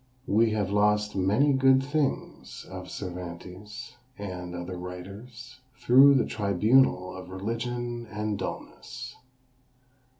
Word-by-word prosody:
We 110 +3 +3
have 105 -3 -1
lost 105 0 +2
many 105 +10 +3
good 130 0 +4
things 145 0 -3
of 95 -1 -8
Cervantes, 90 +6 -8 0.2
and 90 -3 -6
other 90 +1 -5
writers, 100 +9 -9 0.2
through 135 +2 +7
the 130 - +3
tribunal 100 -1 +2
of 95 -1 -9
religion 120 +4 -4
and 105 0 -2
dulness. 95 -1 -7
105 Hz, 105 wpm, -27 LUFS, 95-120 Hz, 0.2 s, through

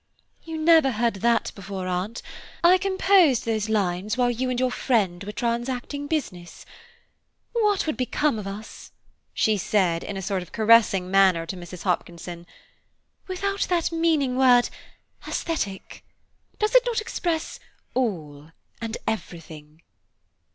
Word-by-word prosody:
"You 325 -1 -6
never 315 -3 +5
heard 230 -1 0
that 235 +3 +1
before, 195 -1 -6
Aunt. 185 +5 -3 0.4
I 360 +2 +6
composed 375 - +3
those 220 -2 -1
lines 200 0 0
while 245 -1 +2
you 255 +2 -2
and 250 -1 -1
your 255 -1 +1
friend 200 -9 0
were 205 - -5
transacting 245 +5 -3
business. 180 - -4 0.9
What 420 -4 +1
would 310 - -2
become 255 0 0
of 200 - -6
us," 205 +2 -9 0.4
she 215 -1 +1
said 180 -4 +1
in 200 - -5
a - - -4
sort 195 0 -1
of 180 - -11
caressing 215 -5 +4
manner 190 -4 +4
to 165 - -5
Mrs. 175 -1 -9
Hopkinson, 175 -1 -3 0.8
"without 395 +1 -2
that 345 -2 +1
meaning 320 -6 +1
word 250 -2 +5 0.6
aesthetic? 200 - -4 0.5
Does 425 +2 0
not - - -7
it - - +2
express 345 -7 -3 0.3
all 160 - -3 0.3
and 225 0 -4
everything?" 160 -6 -6
225 Hz, 135 wpm, -24 LUFS, 185-295 Hz, 0.9 s, I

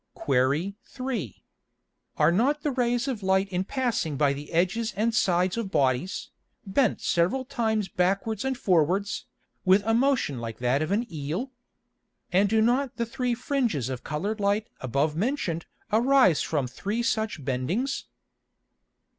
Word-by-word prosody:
Qu. 140 +8 +1
3. 250 - -5 0.7
Are 155 +2 +4
not 275 +11 +1
the 295 - +1
Rays 245 0 0
of 250 -6 -2
Light 190 0 +2
in 185 -1 -1
passing 225 - -1
by 140 -1 +3
the 145 +1 -8
edges 185 +7 0
and 225 +2 +1
sides 180 -1 +2
of 230 -4 -2
Bodies, 140 - 0 0.3
bent 215 +5 +1
several 185 +11 +1
times 220 -4 0
backwards 195 +4 0
and 265 -1 -1
forwards, 190 - +1 0.4
with 190 +2 +5
a 225 - +2
motion 245 - +2
like 115 -1 -5
that 125 +3 +1
of 155 - -1
an 220 +4 +1
Eel? 160 - -3 0.8
And 195 +3 +3
do 220 +1 +3
not 250 +3 +1
the 235 - -1
three 245 +1 -1
Fringes 235 - -1
of 130 -2 -5
colour'd 200 +9 -3
Light 205 +2 +1
above 140 +4 0
mention'd 190 - -1 0.3
arise 245 - +5
from 145 -5 0
three 205 - -3
such 220 - -1
bendings? 165 - -1
200 Hz, 145 wpm, -26 LUFS, 155-235 Hz, 0.8 s, with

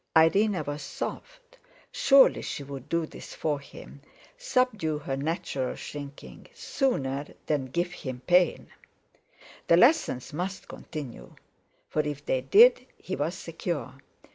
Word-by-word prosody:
Irene 185 +2 +4
was 145 +1 -4
soft, - - -7 0.3
surely 275 -1 +5
she 140 - -5
would 135 -2 -9
do 170 -1 +1
this - - -11
for 150 -2 -1
him, 140 0 -13 0.3
subdue 250 - 0
her 145 -2 -4
natural 140 -3 -2
shrinking, 145 -1 -9
sooner 145 - -1 0.2
than 145 -4 0
give 175 +7 -1
him 130 -7 -6
pain! 180 0 +3 1.0
The 170 - +6
lessons 240 - +3
must 185 +5 -4
continue; 130 - -8 0.5
for - - -3
if 145 -1 -5
they 130 - 0
did, 465 - +6
he - - -5
was - - -2
secure. - - -4
155 Hz, 125 wpm, -27 LUFS, 140-205 Hz, 1.0 s, The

